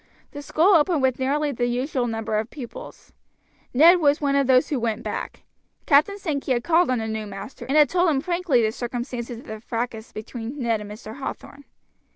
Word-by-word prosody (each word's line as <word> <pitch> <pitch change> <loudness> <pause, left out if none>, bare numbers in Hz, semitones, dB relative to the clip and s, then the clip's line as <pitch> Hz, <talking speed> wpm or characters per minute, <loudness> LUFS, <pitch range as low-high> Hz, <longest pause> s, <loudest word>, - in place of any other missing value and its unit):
The 290 - -7
school 330 +7 +3
opened 320 -3 +3
with 260 -1 +1
nearly 290 +3 0
the 240 -2 -1
usual 250 +1 -1
number 225 -1 -2
of 220 +2 -4
pupils. 300 - -10 0.6
Ned 335 +7 +7
was 295 -2 +3
one 280 -2 0
of 280 -2 +2
those 255 -1 +4
who 285 - -1
went 230 0 -2
back. - - -5 0.4
Captain 310 +8 +4
Sankey 290 -8 -2
had 240 -1 -1
called 345 -1 +3
on 255 - +1
the 220 -1 -3
new 220 -1 -4
master, 195 +6 -8
and 275 +3 +1
had 300 -1 +7
told 360 -1 +2
him 285 -4 +1
frankly 340 -6 +1
the 215 - +1
circumstances 240 0 -5
of 245 - -12
the 220 0 -7
fracas 230 0 -5
between 230 +4 -7
Ned 230 -5 0
and 205 - -8
Mr. 215 +2 -9
Hathorn. 280 +1 -7
260 Hz, 200 wpm, -24 LUFS, 230-295 Hz, 0.6 s, Ned